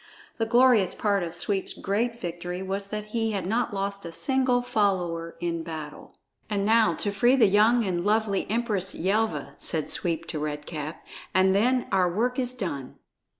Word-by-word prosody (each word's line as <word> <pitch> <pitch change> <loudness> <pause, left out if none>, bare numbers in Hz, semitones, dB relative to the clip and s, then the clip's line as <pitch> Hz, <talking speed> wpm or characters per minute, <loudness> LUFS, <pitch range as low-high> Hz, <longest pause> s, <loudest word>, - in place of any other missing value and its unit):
The 225 - +1
glorious 240 -4 +4
part 200 -2 +1
of 170 -1 -4
Sweep's 195 +2 -1
great 230 +4 -1
victory 175 +1 -5
was 195 +1 -3
that 210 +1 -5
he 225 -2 0
had 195 -3 -2
not 230 +5 0
lost 200 0 -3
a 170 - -6
single 255 - +1
follower 180 -7 0
in 170 -1 -2
battle! 155 -2 -8 0.3
"And 200 -2 0
now 225 +1 +4
to 205 - -1
free 240 +6 +4
the 260 - +5
young 215 +4 +4
and 175 -2 -1
lovely 210 -1 +1
Empress 215 -4 0
Yelva," 215 +5 -1
said 160 -3 -1
Sweep 170 -2 -1
to 155 - -3
Red 150 0 -4
Cap, 155 -1 -6 0.3
"and 190 0 +5
then 245 +5 +2
our 185 -3 +3
work 245 +7 0
is 255 0 -1
done." 145 - -5
200 Hz, 175 wpm, -26 LUFS, 175-225 Hz, 0.3 s, the